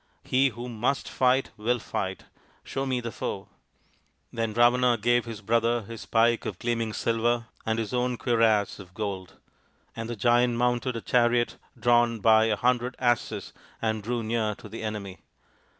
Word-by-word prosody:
" - - -43
He 135 +2 +5
who 120 +1 -7
must 120 +3 -1
fight 130 +1 +2
will 120 +4 +1
fight. 115 - -4 0.4
Show 135 0 -3
me 130 -2 0
the 115 -1 -5
foe." - - -5 0.8
Then 115 -1 -1
Ravana 120 +2 +4
gave 120 +2 +2
his 115 -3 -7
brother 115 +2 +1
his 115 +2 -9
pike 115 +1 +3
of 95 - -5
gleam 120 +1 -1
ing 110 -1 -3
silver 115 +1 0 0.2
and 110 0 +1
his 115 +1 -3
own 125 0 0
cuirass 115 -5 +2
of 90 -2 -13
gold; 100 -4 -5 0.6
and 115 0 -5
the 120 - -3
Giant 120 +2 +3
mounted 125 +1 0
a 115 - -4
chariot 120 0 +2 0.2
drawn 120 -1 +3
by 110 +1 +5
a 110 -1 +2
hundred 125 +2 +1
asses 120 -2 -1 0.3
and 110 -1 -1
drew 120 +2 -2
near 110 -1 -1
to - - -12
the 110 +2 -8
enemy. 105 -4 -5
115 Hz, 170 wpm, -27 LUFS, 110-120 Hz, 0.8 s, He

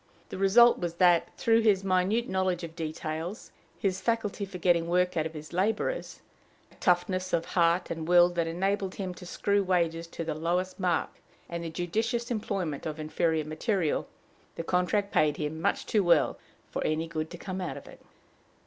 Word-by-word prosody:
The - - -6
result 235 +5 +6
was 175 -2 -3
that, 175 -1 +4
through 230 0 +3
his 205 -4 +3
minute 195 +5 +1
knowledge 185 -2 0
of 165 -1 -7
details, 160 +3 -5 0.3
his 190 -1 -1
faculty 225 -3 -1
for 190 -1 -8
getting 170 -1 +2
work 180 +1 +1
out 160 -1 +1
of 160 - -13
his 155 +1 -9
laborers, 215 - -1 0.5
a - - -20
toughness 185 +1 +1
of 170 -1 +1
heart 170 0 +2
and 160 -1 -4
will 175 0 +7
that 170 -2 -1
enabled 195 +3 -1
him 185 -2 -4
to 180 0 -11
screw 200 +2 +1
wages 170 -3 0
to 170 - -6
the 160 -1 -2
lowest 175 +5 -1
mark, 180 -3 0 0.4
and 170 0 -5
the 165 - -4
judicious 225 +9 -2
employment 190 -10 -2
of 155 0 -5
inferior 155 0 0
material, 165 +2 -1 0.5
the 165 - -4
contract 180 +4 0
paid 150 -1 +3
him 155 +1 -3
much - - 0
too 210 -3 +2
well 175 -1 +3 0.3
for - - -2
any 155 +1 0
good 160 -1 -4
to 175 - -8
come 185 +1 -5
out 180 - -4
of - - -11
it. - - -14
180 Hz, 185 wpm, -28 LUFS, 165-195 Hz, 0.5 s, will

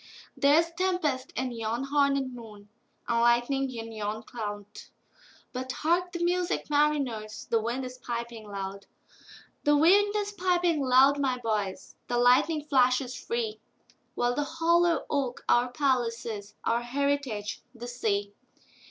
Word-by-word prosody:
There's 315 +4 +4
tempest 335 -7 -1
in 255 0 -2
yon 230 +3 -3
hornèd 275 -2 +2
moon, 210 -4 -12 0.4
And 235 -1 +1
lightning 240 +3 +2
in 230 -2 -6
yon 215 0 -4
cloud:But 215 +4 -9
hark 350 +3 0
the 345 -1 -3
music, 355 -2 0
mariners! 265 -8 0
The 230 -1 +3
wind 240 +4 -2
is 255 0 -9
piping 235 -3 -5
loud; 195 0 -6 0.8
The 295 0 +4
wind 405 +7 +5
is 410 -1 -1
piping 355 -4 +1
loud, 270 +2 +5
my 260 -3 +1
boys, 215 -5 -3
The 240 - -1
lightning 260 +6 +4
flashes 255 -2 +2
free—While 235 +1 -4
the 290 - 0
hollow 335 +2 +2
oak 270 -4 -2
our 245 +1 +3
palace 245 -4 0
is, 205 -3 -6
Our 235 +1 +1
heritage 260 -4 -2
the 240 +1 -7
sea. 205 -4 -1
255 Hz, 130 wpm, -28 LUFS, 230-295 Hz, 0.8 s, wind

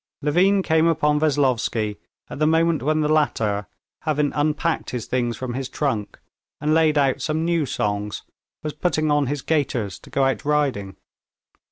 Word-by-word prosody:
Levin 190 +6 +3
came 160 -1 +3
upon 150 -2 +2
Veslovsky 125 -8 +1 0.3
at - - -8
the 155 - +3
moment 165 0 +2
when 155 +3 +1
the 150 - +1
latter, 110 -10 +1 0.3
having 150 -2 0
unpacked 155 +2 0
his 125 -3 -4
things 120 -3 -1
from 130 -2 -4
his 130 +1 -4
trunk, 130 -8 -2 0.4
and 150 +1 +1
laid 160 -1 +3
out 135 -2 +2
some 160 0 -1
new 170 -4 +1
songs, 105 -5 -2 0.4
was 150 -1 -3
putting 155 -3 0
on 145 -2 +2
his 140 -1 -3
gaiters 125 - -1
to - - -16
go 135 - +1
out 135 0 0
riding. 140 -10 0
145 Hz, 165 wpm, -23 LUFS, 125-155 Hz, 0.4 s, Levin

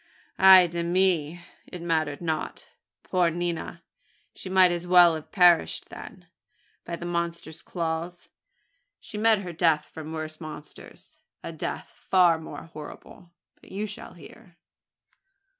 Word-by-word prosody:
Ay 190 -1 +9
de 170 0 -4
mi! 175 -2 +1 0.3
It 180 - -9
mattered 155 -3 -1
not. 160 -2 -4 0.3
Poor 180 -2 +1
nina! 170 0 -4 0.5
She 185 - -9
might 185 -1 +5
as 175 0 -4
well 175 -1 +7
have 155 -1 -7
perished 175 -4 +3
then, - - -11 0.6
by 170 - -5
the 170 - -8
monster's 170 -2 -4
claws. 170 0 -4 0.7
She 210 - -8
met 220 -2 +3
her 175 -2 -7
death 160 -2 +2
from 160 -1 -9
worse 155 0 -6
monsters 155 -1 -11 0.2
a - - -5
death - - -6 0.2
far 175 -3 +5
more 160 - -9
horrible; 160 +2 -12 0.3
but - - -17
you 205 +2 -3
shall 205 -1 -9
hear." 180 +1 -16
170 Hz, 135 wpm, -26 LUFS, 160-180 Hz, 0.7 s, Ay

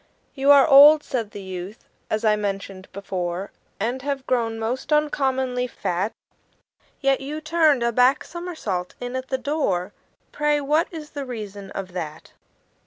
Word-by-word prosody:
"You 275 0 0
are 285 0 +8
old," 295 +1 +8
said 230 -5 -3
the 200 -1 -9
youth, 190 +3 -8 0.2
"as 215 +1 -1
I 215 -1 +5
mentioned 195 -2 -5
before, 185 -1 -4 0.3
And 240 +5 -2
have 275 -1 -3
grown 230 -3 0
most 235 +6 -3
uncommonly 265 -4 +1
fat; 190 -2 -2 0.9
Yet 275 -1 +2
you 295 +3 -5
turned 310 -4 +3
a 235 - +2
back 250 +4 +3
somersault 315 - -5
in 245 +1 -5
at 260 0 -4
the 265 - -1
door 245 - -1 0.4
Pray, 295 0 +1
what 300 +4 +1
is 310 -3 -8
the 285 - -5
reason 210 -6 -7
of 190 -2 -5
that?" 160 -4 -6
250 Hz, 155 wpm, -23 LUFS, 200-285 Hz, 0.9 s, are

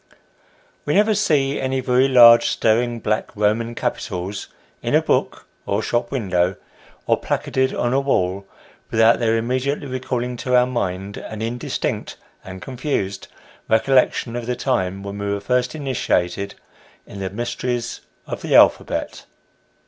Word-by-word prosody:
WE - - +1
never 215 +2 +4
see 145 -9 +1
any 130 0 -1
very 130 +1 +3
large, 120 -3 +8
staring, 120 +1 +1
black 110 0 -1
Roman 110 +3 0
capitals, 95 -1 -4 0.3
in - - 0
a - - +5
book, - - 0 0.2
or 100 +2 0
shop 120 +1 -1
window, 95 -7 0 0.5
or - - +2
placarded 130 0 -1
on 120 +1 0
a 135 - +3
wall, 100 -8 0 0.4
without 115 +1 +4
their 115 -1 +2
immedi 130 +4 -1
ately 145 - -8
recalling 125 -1 -3
to 125 +1 0
our 125 0 +5
mind 100 -5 -3
an 110 0 -6
indistinct 120 +2 -3 0.3
and 95 0 -9
confused 125 -7 -3 0.4
recollection 120 +1 +2
of 120 -1 -4
the 125 - -1
time 100 -7 -1
when 100 0 -6
we 100 0 -3
were 100 - -1
first 125 +5 0
initiated 100 - -1 0.5
in 100 - -10
the 95 -1 -3
mysteries 120 +3 -3 0.2
of - - -6
the - - 0
alphabet. - - +3
120 Hz, 145 wpm, -21 LUFS, 100-130 Hz, 0.5 s, large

